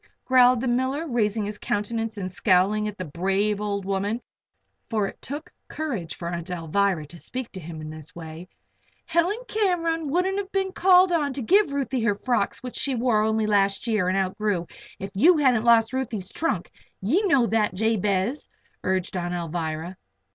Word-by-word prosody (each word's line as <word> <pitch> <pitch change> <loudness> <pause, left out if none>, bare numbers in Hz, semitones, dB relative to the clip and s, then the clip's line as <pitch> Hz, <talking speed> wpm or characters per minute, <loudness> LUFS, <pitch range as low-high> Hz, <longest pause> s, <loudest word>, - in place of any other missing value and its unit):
growled 255 -1 +5
the 260 - -2
miller, 260 +6 0
raising 220 -6 0
his 210 0 -5
countenance 225 +1 -2
and 185 -2 -4
scowling 200 +3 +2
at 210 -1 -6
the 185 - -4
brave 195 +6 0
old 200 -2 -2
woman 200 +3 -1 0.7
for 215 -3 +1
it - - -7
took 290 +4 -7
courage 230 - -4
for 170 - -6
Aunt 170 +1 -4
Alvirah 180 0 0
to 170 - -11
speak 255 +5 -6
to 190 - -7
him 160 -2 -8
in 155 0 -7
this 155 -1 -11
way. 165 +2 -9 0.6
"Helen 340 +5 +1
Cam'ron 335 -6 0
wouldn't 370 +5 +1
have 400 -1 -5
been 385 -1 0
called 370 0 +5
on 295 -5 +1
to 270 - -4
give 385 - +4
Ruthie 270 -3 -1
her 215 -3 +2
frocks 240 +1 -1
which 250 - -5
she 275 - 0
only 235 - -2 0.4
wore - - -1
last 200 0 +2
year, 215 -6 +1
and 185 +1 +1
outgrew, 190 -1 0 0.3
if 195 +1 -6
you 320 - +5
hadn't 250 -6 +3
lost 230 0 +5
Ruthie's 230 -8 -3
trunk. 210 - -2 0.3
Ye 265 - +2
know 275 -9 +4
that, 215 -5 +1
Jabez," 210 +3 0 0.3
urged 185 0 -1
Aunt 175 0 -2
Alvirah. 165 +1 -4
215 Hz, 175 wpm, -25 LUFS, 185-265 Hz, 0.7 s, growled